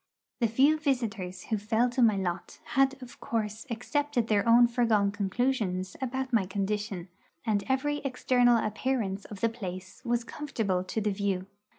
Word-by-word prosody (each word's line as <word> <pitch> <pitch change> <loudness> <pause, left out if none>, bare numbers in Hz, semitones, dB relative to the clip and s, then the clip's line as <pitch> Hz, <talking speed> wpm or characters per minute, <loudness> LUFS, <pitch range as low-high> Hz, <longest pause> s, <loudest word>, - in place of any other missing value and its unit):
The 235 - +3
few 275 +8 +4
visitors 220 - -2
who 220 - -1
fell 220 +4 +2
to 250 - 0
my 220 -3 +5
lot 180 -1 -3 0.2
had 270 +1 +3
of 240 -1 -12
course 220 +1 -3
accepted 255 +1 -1
their 210 +1 +2
own 240 +1 +8
foregone 230 -4 +2
conclusions 200 -3 -1
about 265 0 -3
my 205 -5 +3
condition, 200 -1 -2 0.4
and 210 -3 +1
every 290 +3 +1
external 250 -3 +3
appearance 215 -3 -1
of 205 -3 -9
the 230 - +3
place 190 -4 -7
was 240 -1 0
comfortable 220 -10 -2
to 220 - -2
the 210 0 +1
view. 195 -2 -1
225 Hz, 160 wpm, -29 LUFS, 200-250 Hz, 0.4 s, own